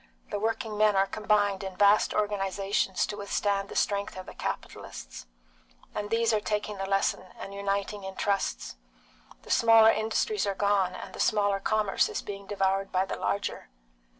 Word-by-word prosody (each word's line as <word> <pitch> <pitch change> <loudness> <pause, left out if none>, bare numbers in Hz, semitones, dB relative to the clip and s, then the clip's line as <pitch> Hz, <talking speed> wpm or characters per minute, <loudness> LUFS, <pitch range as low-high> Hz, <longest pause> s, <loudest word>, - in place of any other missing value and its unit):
The 205 - -1
working 220 0 -2
men 215 -1 +4
are 195 0 +4
combined 205 -1 +1
in 190 -1 -6
vast 205 +1 +5
organisations 195 -2 0
to 205 - -6
withstand 200 0 -1
the - - -8
strength 200 -2 0
of 185 - -7
the - - -10
capitalists, - - -6 0.7
and 205 0 -4
these 230 +1 +2
are 215 - +3
taking 210 0 -2
the 195 - -2
lesson 195 0 +1 0.2
and 195 - -8
uniting 200 +1 -2
in 190 0 -6
trusts. 190 - -1 0.7
The - - -8
smaller 225 -1 +7
industries 220 - 0
are 200 - -1
gone, 195 -2 +1
and - - -8
the - - -9
smaller 205 -2 +2
commerce 215 -1 +1
is - - -4
being 200 -1 -7
devoured 195 -1 0
by 185 0 +2
the - - -4
larger. 200 +1 -3
200 Hz, 170 wpm, -28 LUFS, 195-210 Hz, 0.7 s, smaller